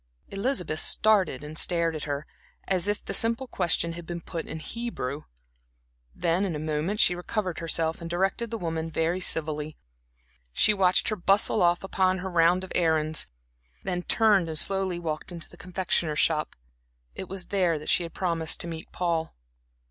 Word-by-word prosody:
Elizabeth 195 - -1
started 195 -11 +3
and 155 +2 -4
stared 170 -2 +1
at 155 - -4
her, 145 0 -3 0.4
as 190 0 +1
if 205 0 -1
the - - -4
simple 230 +3 +2
question 170 -7 0
had 170 +1 -7
been 175 0 -4
put 165 0 -6
in - - -5
Hebrew. 155 - -5 0.9
Then 170 +2 +1
in 185 -5 -1
a - - -2
moment 155 +6 -2
she 180 - +6
recovered 180 0 -3
herself 165 0 0
and 165 - -6
directed 195 +7 0
the 230 - -3
woman 165 -3 -3
very 165 +3 0
civilly. 155 -3 -1 0.7
She 210 - +4
watched 185 -2 +3
her 215 - 0
bustle 200 +3 +3
off 175 0 +3
upon 190 -1 +1
her 190 +1 -5
round 175 +2 +4
of 190 - -8
errands, 160 -2 +2 0.6
then 180 0 -1
turned 200 -3 +3
and 160 - -3
slowly 190 0 +1
walked 160 0 -4
into 170 -2 -5
the - - -13
confectioner's 175 -4 -1
shop. 155 -1 +1 0.6
It 190 - -7
was 190 -1 -6
there 180 -5 +2
that 150 - -6
she - - +4
had 170 -1 -6
promised 165 -3 -1
to - - -2
meet 165 -1 -7
Paul. 170 -2 -1
175 Hz, 175 wpm, -27 LUFS, 160-190 Hz, 0.9 s, she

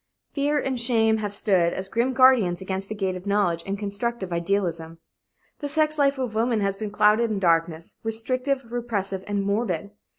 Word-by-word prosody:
Fear 290 +1 +1
and 265 -2 -2
shame 225 -2 +3
have 205 -2 -4
stood 185 -5 +2
as 190 - -3
grim 235 +6 0
guardians 250 -9 +4
against 190 +1 -4
the 215 - -4
gate 190 -3 -2
of 185 +2 -8
knowledge 200 -5 +1
and 195 +1 -2
constructive 200 -1 -3
idealism. 170 -2 -2 0.6
The 290 - -3
sex 305 +1 +1
life 280 -1 +3
of 255 -4 -3
women 225 +1 +1
has 195 -1 0
been 210 +1 -5
clouded 210 +2 +3
in 215 - -1
darkness, 165 -3 0
restrictive, 255 +3 -2
repressive 205 -6 -3
and 205 -1 -1
morbid. 200 -2 -1
210 Hz, 175 wpm, -24 LUFS, 190-240 Hz, 0.6 s, guardians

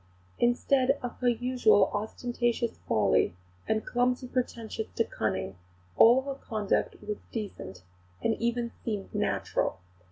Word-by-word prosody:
Instead 260 +3 +3
of 245 - -4
her 250 - +1
usual 240 -4 +3
ostentatious 235 +2 -1
folly 105 -5 +3 0.3
and 220 0 0
clumsy 250 +1 0
pretensions 230 -3 -3
to 230 - +3
cunning, 105 - -3 0.4
all 245 +4 +7
her 275 0 -3
conduct 215 -6 -1
was 210 -1 -2
decent, 95 - -6 0.4
and 225 - +3
even 235 0 0
seemed 210 -4 -4
natural. 70 +3 0
235 Hz, 120 wpm, -29 LUFS, 210-245 Hz, 0.4 s, all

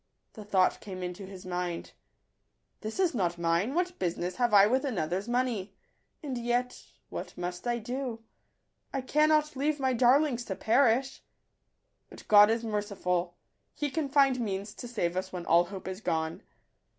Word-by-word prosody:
The 215 - -9
thought 190 -3 +2
came 185 -3 -7
into 180 +2 -6
his 190 -2 -10
mind, 180 -1 -3 0.3
— - - -49
" - - -48
This 220 - -5
is 365 -4 +2
not 175 -7 0
mine: 170 - 0
what 360 0 -1
business 175 0 -2
have 245 -1 +2
I 200 -1 +8
with 255 +5 +2
another's 190 - -2
money? 240 -6 -1 0.5
And 265 -4 -3
yet 240 +1 -1
— - - -40
what - - -6
must 180 +4 -5
I 240 0 +1
do? 245 0 -4 0.7
I 270 - -2
cannot 305 +3 +2
leave 290 +2 0
my 260 -1 +1
darlings 250 +1 +3
to 190 - -4
perish! 255 +4 +2 0.9
But - - -13
God 210 0 +8
is 230 +1 0
merciful; 195 -5 -2 0.4
He 290 -2 -2
can 305 -2 -2
find 270 -2 +4
means 205 -2 -3
to 245 - -8
save 180 -8 -2
us 185 +1 -3
when 180 -2 -6
all 170 +2 +5
hope 190 +1 -8
is 190 +2 -5
gone. 160 -4 -2
220 Hz, 175 wpm, -29 LUFS, 185-255 Hz, 0.9 s, I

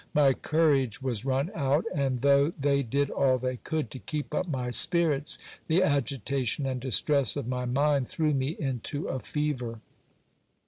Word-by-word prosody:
My 140 -2 +5
courage 140 -7 +1
was 120 -3 -2
run 135 +6 0
out; 145 +1 +1
and 135 -4 -1
though 140 +1 +5
they 140 0 +2
did 140 +3 -1
all 130 -2 +2
they 130 0 -3
could 155 -1 -3
to 130 - -7
keep 150 +1 -5
up 185 +4 -1
my 130 -5 -2
spirits, 155 - +3 0.3
the 170 +3 +3
agitation 140 - -1
and 130 -2 -2
distress 135 0 +1
of - - -4
my 125 0 -2
mind 140 +1 +1
threw 155 -2 0
me 135 +4 -1
into 135 +1 -3
a 130 - -2
fever. 130 -6 -3
140 Hz, 165 wpm, -28 LUFS, 130-150 Hz, 0.3 s, My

